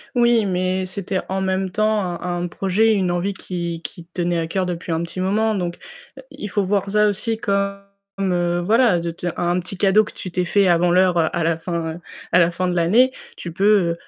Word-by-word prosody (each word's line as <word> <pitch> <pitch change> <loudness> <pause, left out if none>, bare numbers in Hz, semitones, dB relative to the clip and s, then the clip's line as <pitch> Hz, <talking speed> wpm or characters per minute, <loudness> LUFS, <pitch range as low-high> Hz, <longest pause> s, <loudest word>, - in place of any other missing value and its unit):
Oui, 235 -3 +4
mais 185 0 -1
c'était 190 0 -3
en 190 0 -1
même 190 0 -1
temps 215 +2 +1 0.2
un 175 0 -2
un - - -1
projet, 195 +5 +1
une 190 -4 +1
envie 175 +3 -1
qui 170 -3 -5
qui 165 +3 -8
te 175 +1 -6
tenait 175 0 0
à 165 - -2
coeur 185 +2 -1
depuis 175 -1 -4
un 165 +1 0
petit 170 +2 -7
moment 215 +4 +1
donc 175 -3 -2 0.6
il 210 - -7
faut 200 +2 0
voir 195 0 0
ça 210 +1 +3
aussi 215 +2 -1
comme, 200 -1 -1 0.4
heu, 175 -2 0
voilà 220 0 +3
de 170 0 -3
te 170 +2 -6
un 175 +1 +1
petit 180 +2 -5
cadeau 200 +3 +4
que - - -10
tu 185 - -7
t'es 180 0 -1
fait 200 +2 +3
avant 175 0 +3
l'heure 180 0 +3
à 165 +1 +1
la 165 0 +1
fin 165 -1 -4 0.3
à 180 - +5
la 170 0 +4
fin 185 +2 -2
de 180 - -1
l'année. 210 +10 +4 0.3
Tu 170 - -6
peux 195 -2 +3
185 Hz, 215 wpm, -21 LUFS, 175-200 Hz, 0.6 s, à